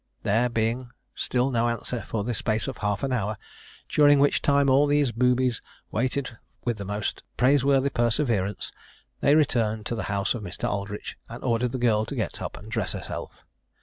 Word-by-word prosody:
There 115 +4 +2
being 115 +2 -1 0.2
still 125 +2 +1
no 120 -1 +2
answer 115 0 -3
for 105 -3 -3
the 120 +3 -2
space 110 +4 -1
of 135 - -5
half 105 +2 -1
an 135 - 0
hour, 105 -3 -1 0.5
during 145 -1 +5
which 140 +1 +3
time 140 -1 +3
all 140 +2 +5
these 145 -3 +3
boobies 125 0 +2 0.3
waited 125 0 -2 0.3
with 120 -3 -1
the 100 - -4
most 105 +1 -3 0.2
praiseworthy 135 +1 +3
perseverance, 115 -5 0 0.5
they 145 - +4
returned 110 -8 +2
to 120 - -2
the 110 - -3
house 100 -1 +1
of 120 - -5
Mr. 90 -3 -4
Aldritch, 100 +1 -4
and 120 +1 -8
ordered 120 -1 +1
the 130 - -2
girl 110 -3 +2
to 140 - -6
get 110 -7 -3
up - - -5
and - - -11
dress - - -1
herself. - - -7
120 Hz, 180 wpm, -26 LUFS, 110-130 Hz, 0.5 s, during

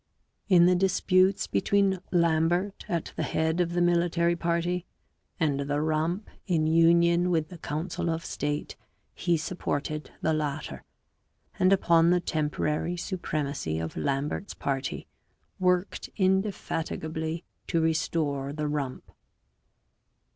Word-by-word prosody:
In 175 -3 +7
the 180 - +5
disputes 185 +1 +3
between 190 - +2
Lambert 170 +3 +1
at 170 -2 -2
the - - -2
head 160 +2 0
of 170 -1 -1
the 175 - +1
military 170 0 +2
party 170 +1 -1 0.5
and 145 -4 +1
the 145 +1 -1
Rump 160 +6 0 0.2
in 165 -4 +2
union 170 +2 +4
with 160 -3 +1
the 175 -2 -10
council 165 +3 -3
of 165 0 -2
state, 145 0 -3 0.4
he 175 -2 +1
supported 155 -2 -3
the 160 - +1
latter, 150 -1 -3 0.8
and 185 +1 +4
upon 170 -3 +4
the 180 0 +4
temporary 155 +1 -1
supremacy 150 - -3
of 80 0 -4
Lambert's 140 - -2
party 135 -1 -3 0.5
worked 180 +1 0
indefatigably 165 -4 -1 0.2
to 165 - +1
restore 155 -3 0
the 150 0 -2
Rump. 145 -3 -4
165 Hz, 120 wpm, -28 LUFS, 150-175 Hz, 0.8 s, In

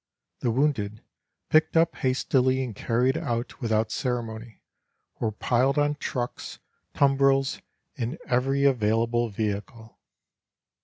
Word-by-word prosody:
The 120 - 0
wounded, 115 -5 0 0.5
picked 155 +1 +3
up 165 0 +3
hastily 130 0 +1
and 125 -3 -5
carried 125 +5 +1
out 120 +2 -3
without 110 -2 0
ceremony, 115 -2 -4 0.6
were 110 - 0
piled 125 +6 +1
on 145 0 +2
trucks, 125 -4 -5 0.4
tumbrils 135 -1 +3 0.4
and 120 +6 -2
every 135 +3 +1
available 115 -2 +2
vehicle. 105 +2 -5
125 Hz, 105 wpm, -26 LUFS, 115-135 Hz, 0.6 s, picked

